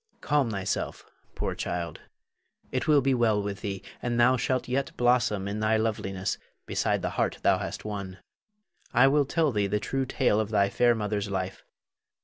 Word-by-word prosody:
Her. - - -37
Calm 145 -5 +2
thyself, 95 -3 -3 0.3
poor - - -2
child; 85 -1 -4 0.7
it - - -1
will 150 -2 +5
be 135 0 +2
well 115 -4 +3
with 100 0 -4
thee, 100 -2 -4 0.2
and 120 -1 -1
thou 125 +2 +6
shalt 130 +1 -1
yet 135 +2 -2
blossom 120 -5 +2
in 100 +1 -3
thy 110 +1 +2
loveliness 95 -4 -2 0.3
beside - - 0
the - - -1
heart - - 0
thou - - +4
hast - - -5
won. 100 -3 -5 0.8
I 125 +3 +7
will 145 +1 +3
tell 155 +1 +1
thee 105 -3 +1
the 105 +2 0
true 135 +4 -2
tale 125 -5 +2
of 110 -1 -1
thy 100 -2 +3
fair 120 +3 +3
mother's 105 -2 -2
life. 95 -1 -3
110 Hz, 180 wpm, -27 LUFS, 100-125 Hz, 0.8 s, I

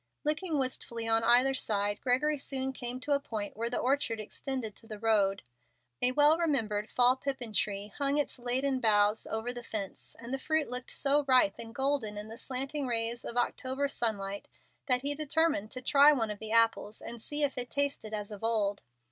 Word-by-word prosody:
Looking 310 +2 0
wistfully 235 -3 -3
on 225 0 +3
either 245 +3 +5
side, 205 -4 -1
Gregory 285 +4 +1
soon 265 -1 -3
came 245 0 -4
to 295 - -4
a 280 - +3
point 215 -7 -5
where 230 +2 -2
the 245 - -2
orchard 255 -4 0
extended 225 0 -4
to 225 - -15
the 215 -2 -6
road. 205 - +2 0.6
A 250 - +3
well 295 +4 +5
remembered 225 -10 0
fall 250 +1 +4
pippin 260 -4 -4
tree 205 -1 -1
hung 280 0 +1
its 290 -3 -1
laden 260 +2 0
boughs 210 -2 +3
over 220 +3 -3
the 245 - -6
fence, 210 -4 -6
and 235 +2 -7
the 270 - -1
fruit 315 -1 0
looked 250 0 -4
so 285 +1 +2
ripe 255 -6 +4
and 230 0 -8
golden 265 -6 0
in 210 +1 -6
the 225 - -9
slanting 270 +2 -3
rays 235 0 -1
of 235 - -5
October 260 +3 0
sunlight 200 -6 -2 0.4
that 250 -1 +3
he 285 +1 0
determined 305 -6 +1
to 255 +2 -7
try 285 +2 +7
one 225 -7 0
of 205 - -7
the 220 0 -5
apples 230 -2 +2
and 235 -1 -7
see 295 +5 -2
if 280 - +1
it 245 -1 -4
tasted 280 -6 -1
as 210 -1 -4
of 210 0 -9
old. 210 -3 0
245 Hz, 200 wpm, -31 LUFS, 220-275 Hz, 0.6 s, try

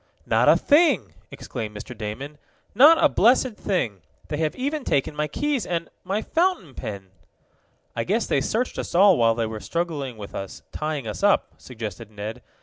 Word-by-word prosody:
"Not - - +3
a - - +7
thing!" 285 - +3 0.2
exclaimed 105 -2 -6
Mr. 125 +4 -8
Damon. 125 +8 -6 0.3
"Not 295 +9 +8
a - - +8
blessed 250 0 +3
thing! 120 - -2 0.3
They 150 - -2
have 155 -1 -1
even 285 +3 -2
taken 140 - 0
my 150 0 -1
keys 290 - -1
and 170 -1 -3
my 195 +4 -2
fountain 340 - 0
pen!" 95 -5 -7 0.8
"I 115 - -1
guess 215 - 0
they - - +1
searched 245 +3 -1
us - - -5
all 195 +1 +7
while 115 -3 +3
they 115 -1 0
were 110 -1 -5
struggling 150 -5 -3
with 100 -2 -9
us, 95 -1 -7
tying 150 -5 -3
us 105 - -5
up," 205 0 +2
suggested 110 -6 -7
Ned. 110 +3 -7
150 Hz, 175 wpm, -24 LUFS, -, 0.8 s, Not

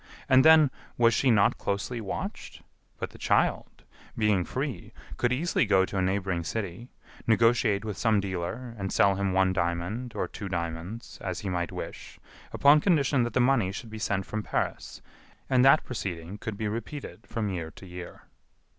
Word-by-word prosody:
And 130 0 +6
then, 155 -3 +7 0.3
was 120 0 +5
she 130 - +2
not 105 -4 +3
closely 110 +4 -2
watched? 100 - -6 0.3
But - - -5
the - - -15
child, - - 0 0.3
being 105 -4 +2
free, - - -4 0.2
could 120 - +1
easily 160 +8 +1
go 95 0 +4
to 100 - -8
a - - +2
neighboring 95 -2 -1
city, 100 +5 -5 0.4
negotiate 115 -2 +3
with 105 -6 -5
some 110 +1 +3
dealer 100 +6 -4
and 95 0 -3
sell 100 +1 +4
him 100 0 -1
one 95 0 +3
diamond 90 +7 -2
or - - -1
two 100 - -7
diamonds, 85 +5 -5
as 90 -2 -4
he 100 - -4
might 90 -1 -2
wish, - - -8 0.3
upon 145 +2 +5
condition 145 -7 +3
that 120 0 -1
the - - +2
money 120 -7 +3
should 110 +3 -8
be 110 - -7
sent 100 -3 -1
from 110 - -3
Paris, - - -3 0.4
and 130 -2 +3
that 135 +3 +6
proceeding 95 -5 -5
could 110 -2 -5
be 110 - -2
repeated 115 +7 -6
from 115 -3 -2
year 85 -3 -4
to 95 - -14
year." 90 -1 -9
105 Hz, 175 wpm, -28 LUFS, 95-120 Hz, 0.4 s, then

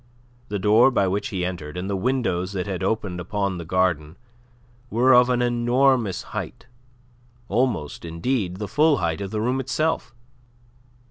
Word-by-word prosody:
The 105 - -3
door 105 +6 +5
by 100 -7 +1
which 100 +2 -1
he 90 -3 -2
entered, 85 -4 -5
and 90 +1 -3
the 100 - -1
windows 95 -5 -1
that 95 0 -3
opened 95 -2 -1
upon 100 +1 -2
the 85 - -6
garden, 85 -3 0 0.7
were 125 +4 +4
of 125 0 +6
an 125 -1 +2
enormous 120 -3 +2
height - - -5 0.8
almost, 110 - -1
indeed, 90 +3 -2
the 105 +1 -4
full 150 +6 +3
height 85 0 -1
of 100 - -4
the 105 +1 -2
room 125 +4 0
itself. 135 -1 -1
105 Hz, 150 wpm, -23 LUFS, 90-125 Hz, 0.8 s, of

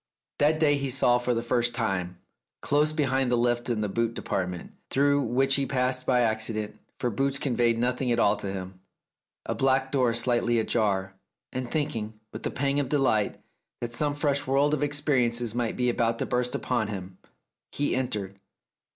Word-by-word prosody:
That 155 +2 +3
day 145 -2 +4
he 140 -1 -2
saw 125 -2 +3
for 125 0 0
the 115 - -1
first 120 0 +1
time, 90 -6 -2 0.5
close 150 +1 +2
beside 135 -4 +1
the 120 - +3
lift 120 0 +1
in 115 -3 0
the 105 - 0
boot 115 +3 -1
department, 90 -2 -3 0.2
through 140 +1 +3
which 135 +1 +2
he 140 0 +2
passed 125 -1 -1
by 125 -1 +4
accident, 110 -2 -2 0.2
for 125 - -1
boots 135 +5 0
conveyed 120 -4 +1
nothing 125 +1 0
at 120 - +2
all 105 -2 +4
to 100 -1 -4
him, 95 -1 -7 0.6
a - - -1
black 135 0 +1
door 125 -4 +2
slightly 120 0 +2
ajar, 100 -4 0 0.4
and 130 -1 -3
thinking, 110 -8 -2
with - - -7
a - - -1
pang 140 +1 0
of 135 -3 -1
delight, 130 -8 +1 0.4
that 120 -1 -5
some 145 +3 0
fresh 145 -2 0
world 140 +3 +3
of 150 - 0
ex 145 0 0
periences 120 -6 +1
might 120 -1 -2
be 125 - +1
about 115 -1 +1
to - - -2
burst 125 0 -1
upon 120 -4 -1
him, 95 -3 -7 0.5
he 145 -3 0
entered. 105 -7 -3
120 Hz, 185 wpm, -27 LUFS, 110-135 Hz, 0.6 s, day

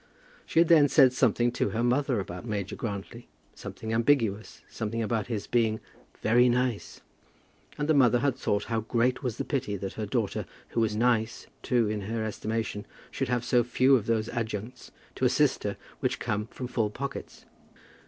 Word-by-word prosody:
She - - -5
had 165 0 +6
then 155 -3 +6
said 135 -3 +5
something 120 -1 +2
to - - 0
her 115 +1 -1
mother 125 0 +1
about 90 -1 -6
Major 105 -4 -3
Grantly, 110 +2 -6 0.3
something 110 0 -6
ambiguous, 115 -3 +1
something 115 +1 -3
about 110 -1 -1
his 110 -4 -3
being 110 -2 +1 0.4
"very 120 +3 +5
nice," 125 -3 -1 0.8
and 145 0 -1
the 160 - +4
mother 125 -4 +5
had 135 +1 +1
thought 105 -5 -1
how 115 -1 -1
great 120 +3 0
was 125 -4 -3
the - - -3
pity 135 -8 -2
that 95 0 -5
her 110 -1 -4
daughter, 110 -1 -1 0.2
who - - -2
was 110 -2 +1
"nice" 115 -1 +1 0.2
too 120 -3 +2
in 105 0 -2
her 110 +3 -3
estimation, 110 0 -3 0.2
should 135 - -2
have 120 -1 0
so 120 -1 +3
few 130 +2 +4
of 110 -5 -1
those 110 -1 +1
adjuncts 115 +1 -5 0.2
to - - -1
assist - - +2
her - - -2 0.2
which - - 0
come 105 +1 -2
from 125 - -7
full 115 -4 0
pockets. 135 +6 -7
115 Hz, 180 wpm, -28 LUFS, 110-125 Hz, 0.8 s, had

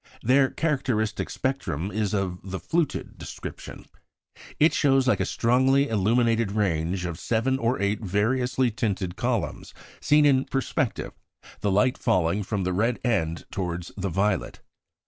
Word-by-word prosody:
Their 130 +3 +4
characteristic 130 -9 -1
spectrum 100 - -2
is 105 -1 -1
of 95 -3 -2
the 95 0 -5
"fluted" 160 - -2
description. - - -8 0.7
It 155 +2 +5
shows 135 -3 +3
like 110 -7 +3
a - - 0
strongly 130 +4 +2
illuminated 115 0 +2
range 90 -3 0
of 85 -1 -5
seven 125 +6 0
or 120 +2 0
eight 100 +2 0
variously 125 +6 +1
tinted 95 -5 -2
columns 120 -4 -2 0.2
seen 150 0 +4
in 135 -2 +4
perspective, 135 -1 -2 0.5
the 105 - 0
light 125 +7 +2
falling 100 -3 +1
from 100 -1 -2
the 90 0 -1
red 115 +6 +1
end 85 -9 0
towards 90 -2 -4
the 95 -1 -3
violet. 95 +2 -1
110 Hz, 140 wpm, -25 LUFS, 95-130 Hz, 0.7 s, It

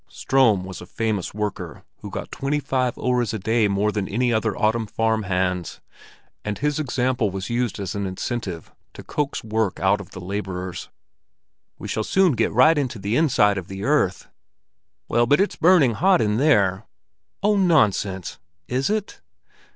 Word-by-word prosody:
Ström 120 -8 +2
was 95 0 -8
a 90 - -10
famous 110 -3 -2
worker 100 -6 -5 0.2
who - - -8
got - - -6
twenty 140 +2 -1
five 130 -3 -1
öres 125 -3 0
a - - -1
day 110 +2 +1
more 100 +1 +1
than 105 -2 -2 0.3
other 110 -1 0
autumn 110 +1 +1
farm 110 +1 0
hands, 90 -2 -2 0.6
and 105 -1 -3
his 150 +1 -1
example 125 -5 0
was 95 +3 -5
used 120 -3 -1
as 95 -2 -4
an 100 -1 -3
incentive 95 -2 -5 0.2
to - - -9
coax 145 -2 -3
work 110 -3 -1
out 100 +2 +2
of 95 - -12
the - - -10
laborers. 95 -1 -5 0.9
"We - - -8
shall 110 - -2
soon 190 - +3
get 115 -4 0
right 145 +7 +5
into 130 -5 -2
the 100 +3 -2
inside 105 -10 +3
of 90 - -10
the 95 0 -7
earth." 135 -10 +1 0.8
"Well, 120 0 +2
but 145 - +4
it's 200 - +1
burning 160 -8 +4
hot 185 - +3
in 105 0 +1
there." 105 -9 +2 0.6
"Oh, 210 +1 +3
nonsense: 105 - +1 0.3
is 130 +2 -1
it?" 210 -1 -3
110 Hz, 165 wpm, -23 LUFS, 100-130 Hz, 0.9 s, right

